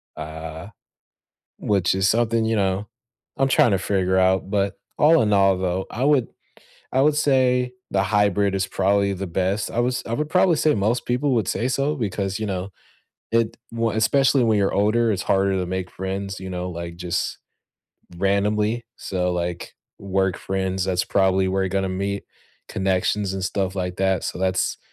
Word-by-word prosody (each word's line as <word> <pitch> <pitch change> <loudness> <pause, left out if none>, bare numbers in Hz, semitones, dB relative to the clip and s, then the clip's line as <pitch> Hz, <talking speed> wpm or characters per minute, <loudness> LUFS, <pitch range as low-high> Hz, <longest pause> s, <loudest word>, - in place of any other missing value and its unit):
uh, 80 +2 -7 0.9
which 95 -4 +1
is 95 0 +2
something, 115 0 +2
you 110 0 +1
know, 100 0 0 0.5
I'm 135 0 +3
trying 120 - +4
to 95 - +2
figure 95 -1 0
out. 95 +1 +2
But 100 -1 0 0.2
all 160 +2 +6
in 105 -1 +1
all, 95 -1 +4
though, 95 0 -1
I 120 - -3
would 140 -4 +3 0.7
I 130 - +3
would 150 +1 +4
say 125 -4 +2 0.2
the 95 - +2
hybrid 100 -1 +2
is 95 -1 0
probably 100 +1 +1
the 95 +1 -4
best. 95 +4 -1
I 120 - -1
was 125 +1 0
I 115 - -5
would 150 +5 -2
probably 180 -1 +4
say 150 0 +3
most 110 +4 0
people 125 +2 +1
would 110 -6 0
say 120 - -1
so 140 +3 0
because, 100 -4 -2
you 110 - -3
know, 95 0 -3 0.6
it 115 -1 +1 0.2
w 115 0 0
especially 135 +4 +3
when 110 -2 +3
you're 100 - +1
older, 110 +3 +2
it's 95 - -2
harder 95 0 +2
to 90 - -2
make 95 0 -4
friends, 95 +1 -4
you 95 0 -6
know, 90 0 -4
like, 85 0 -6
just 90 -1 -2 0.8
randomly. 105 +4 +1
So, 90 -1 -2
like, 85 0 -4 0.2
work 95 -1 0
friends, 95 -1 -2
that's 95 -1 0
probably 95 -1 +2
where 95 +1 0
you're 95 - 0
gonna 95 0 0
meet, 100 +2 -3 0.4
connections 95 +1 0
and 95 - -3
stuff 95 0 -1
like 90 -1 -3
that. 95 -1 +1
So, - - -4
that's 95 0 0
100 Hz, 180 wpm, -23 LUFS, 95-115 Hz, 0.9 s, all